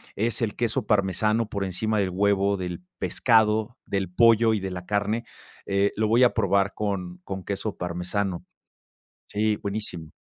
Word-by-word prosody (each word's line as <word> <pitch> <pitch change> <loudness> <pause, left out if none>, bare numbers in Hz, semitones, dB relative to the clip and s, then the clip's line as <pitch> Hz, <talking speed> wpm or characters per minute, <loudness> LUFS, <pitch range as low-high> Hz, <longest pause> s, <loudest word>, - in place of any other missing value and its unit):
es 115 +2 -1
el 110 -3 -1
queso 120 -1 -1
parmesano 105 +2 +1
por 100 -1 -2
encima 105 +3 -1
del 95 -2 +1
huevo, 100 +1 +2
del 90 -2 -5 0.2
pescado, 110 0 +2
del 95 -2 -2
pollo 115 +2 +5
y 105 - -1
de 95 -1 -4
la 90 0 -6
carne. 105 +3 -1 0.4
Eh, 100 +1 +1
lo 110 - +2
voy 115 +4 +4
a 120 - +5
probar 100 -3 +2
con 95 -4 -3
con 95 -1 -5
queso 100 +2 -3
parmesano. 90 +1 -3 0.8
Sí, 105 +1 0
buenísimo. 100 -7 -5
100 Hz, 160 wpm, -25 LUFS, 95-110 Hz, 0.8 s, pollo